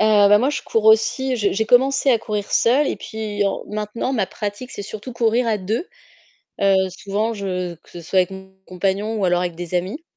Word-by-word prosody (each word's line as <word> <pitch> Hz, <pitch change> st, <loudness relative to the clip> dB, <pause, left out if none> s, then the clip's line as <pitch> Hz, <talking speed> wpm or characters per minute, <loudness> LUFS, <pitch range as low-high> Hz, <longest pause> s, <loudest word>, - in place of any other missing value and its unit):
Heu, 210 Hz, -2 st, +5 dB
bah, 205 Hz, -, +6 dB
moi, 260 Hz, +6 st, +1 dB
je 295 Hz, -, -3 dB
cours 225 Hz, -1 st, -1 dB
aussi, 250 Hz, +4 st, +3 dB
je 205 Hz, -3 st, +1 dB
j'ai 220 Hz, +2 st, 0 dB
commencé 265 Hz, +3 st, +4 dB
à 235 Hz, -, +4 dB
courir 210 Hz, -2 st, -4 dB
seule 265 Hz, +6 st, +3 dB
et -, -, -2 dB
puis 210 Hz, -2 st, -3 dB
au 195 Hz, -, -2 dB
maintenant 215 Hz, +4 st, -3 dB
ma 215 Hz, -7 st, 0 dB
pratique, 210 Hz, +7 st, -6 dB
c'est -, -, -7 dB
surtout 215 Hz, +5 st, -8 dB
courir 235 Hz, +1 st, +1 dB
à 220 Hz, -2 st, +1 dB
2, 215 Hz, -, -2 dB, 0.7 s
heu, 195 Hz, -1 st, +4 dB, 0.2 s
souvent, 205 Hz, +4 st, -2 dB
je 185 Hz, -4 st, -3 dB
que 160 Hz, -, -23 dB
ce 175 Hz, -, -9 dB
soit 170 Hz, +3 st, -1 dB
avec 180 Hz, -, 0 dB
mon 190 Hz, 0 st, -10 dB
compagnon 195 Hz, +4 st, -1 dB
ou 200 Hz, -, -1 dB
alors 175 Hz, 0 st, +2 dB
avec 175 Hz, -1 st, -3 dB
des 175 Hz, 0 st, -6 dB
amis, 190 Hz, -, -2 dB
210 Hz, 220 wpm, -21 LUFS, 190-230 Hz, 0.7 s, bah